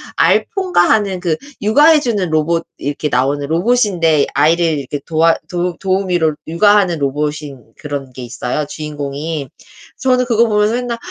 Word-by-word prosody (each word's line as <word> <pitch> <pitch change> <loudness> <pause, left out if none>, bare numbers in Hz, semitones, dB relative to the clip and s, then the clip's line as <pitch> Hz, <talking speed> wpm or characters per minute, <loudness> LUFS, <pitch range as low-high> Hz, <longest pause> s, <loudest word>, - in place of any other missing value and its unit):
알포인가 370 - +2
하는 195 -4 +1
그 170 -4 -1 0.3
육아 235 +9 +4
해 315 -2 +6
주는 210 - -1
로봇 165 +2 0
이렇게 145 +1 -3
나오는 140 +3 0
로봇인데 170 -3 +2
아이를 165 +4 +3
이렇게 140 +1 -5
도와 165 +1 +2
도 175 -1 -2
도우미로 185 -5 0
육아하는 180 -1 +3
로봇인 140 -4 -4
그런 140 -3 -6
게 130 - -9
있어요, 125 +4 -3
주인공이. 145 -1 -5 0.5
저는 250 -1 +2
그거 235 -1 +2
보면서 210 +1 +1
맨날 245 -1 -3
165 Hz, 340 characters per minute, -16 LUFS, 145-210 Hz, 0.5 s, 해